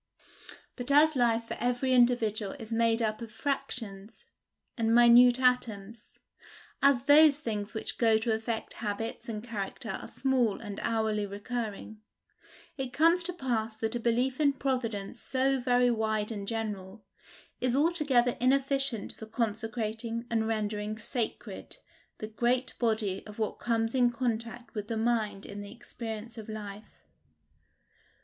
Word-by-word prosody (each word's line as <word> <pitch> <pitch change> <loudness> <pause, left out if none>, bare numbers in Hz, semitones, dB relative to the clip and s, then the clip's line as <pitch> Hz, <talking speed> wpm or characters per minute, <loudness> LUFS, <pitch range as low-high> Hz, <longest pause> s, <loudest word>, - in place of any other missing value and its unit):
But 245 0 -6
as 300 +2 +5
life 235 -2 +2
for - - -4
every 245 +2 +1
individual 230 -4 +2
is 230 -5 -7
made 230 0 +2
up 215 +1 -1
of 230 -2 -7
fractions 225 -5 -4 0.5
and 230 -1 +2
minute 240 +1 +7
atoms 230 -4 0 0.6
as 275 -3 +4
those 290 +1 +7
things 215 -7 -4
which 220 - -4
go 225 -2 +5
to 220 +1 0
affect 220 0 -3
habits 220 +2 -4
and 215 -1 -4
character 220 0 -5
are - - -6
small 245 -4 0
and 205 -3 -7
hourly 220 -2 0
recurring, 215 0 -5 0.8
it 265 -2 -4
comes 330 +5 +4
to 360 - +1
pass 230 -8 -2
that 220 0 -2
a 240 - -1
belief 245 +3 0
in 285 -2 +4
Providence 240 -6 -2
so 270 0 +1
very 245 0 +3
wide 220 -1 -1
and 200 -2 -5
general, 210 -2 -4 0.6
is 250 0 +1
altogether 285 -6 +2
inefficient 270 -2 +1
for 220 - -10
consecrating 225 +1 -3
and 225 -1 +1
rendering 215 -1 -2
sacred 230 0 -4 0.4
the - - -5
great 245 +4 0
body 220 -5 0
of 210 - -11
what 220 -2 -2
comes 225 -1 0
in 250 -2 +4
contact 235 0 -3
with 210 -2 -4
the 225 -1 -2
mind 220 -3 0
in 205 0 -7
the 205 0 -9
experience 225 -1 -7
of 220 - -9
life. 210 -1 -9
230 Hz, 140 wpm, -29 LUFS, 215-250 Hz, 0.8 s, minute